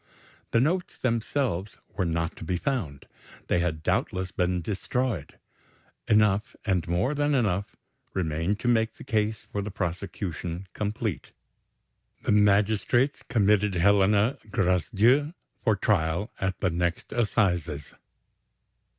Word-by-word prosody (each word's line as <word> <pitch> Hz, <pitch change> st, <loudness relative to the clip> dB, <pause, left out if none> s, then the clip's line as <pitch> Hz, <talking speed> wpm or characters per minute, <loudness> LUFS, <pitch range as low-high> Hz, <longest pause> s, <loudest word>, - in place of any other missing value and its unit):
The 115 Hz, -, +3 dB
notes 170 Hz, +8 st, 0 dB
themselves 115 Hz, -5 st, -1 dB, 0.2 s
were 95 Hz, -4 st, 0 dB
not 85 Hz, 0 st, -1 dB
to -, -, -8 dB
be 90 Hz, +2 st, -1 dB
found; 90 Hz, -, -3 dB, 0.4 s
they -, -, +3 dB
had 80 Hz, -3 st, -1 dB
doubtless 90 Hz, +3 st, 0 dB
been 90 Hz, -1 st, 0 dB
destroyed. 110 Hz, -, -2 dB, 0.7 s
Enough, 105 Hz, 0 st, +3 dB
and 90 Hz, -5 st, +1 dB
more 90 Hz, -, +1 dB
than 145 Hz, 0 st, +1 dB
enough, 100 Hz, -6 st, 0 dB, 0.4 s
remained 85 Hz, +3 st, -1 dB
to -, -, -2 dB
make 110 Hz, -2 st, +2 dB
the -, -, -11 dB
case 110 Hz, -1 st, -1 dB
for 100 Hz, -, -2 dB
the 105 Hz, -, -4 dB
prosecution 90 Hz, -1 st, -4 dB
complete. 105 Hz, -2 st, -3 dB, 0.9 s
The -, -, +1 dB
magistrates 105 Hz, +6 st, +3 dB
committed 105 Hz, -2 st, +3 dB
Helena 100 Hz, +5 st, +3 dB
Gracedieu 105 Hz, -, +2 dB, 0.3 s
for 110 Hz, -3 st, +3 dB
trial 95 Hz, 0 st, 0 dB
at 95 Hz, -1 st, -2 dB
the 90 Hz, -, +2 dB
next 85 Hz, 0 st, -2 dB
assizes. 90 Hz, -10 st, 0 dB
100 Hz, 120 wpm, -27 LUFS, 90-110 Hz, 0.9 s, The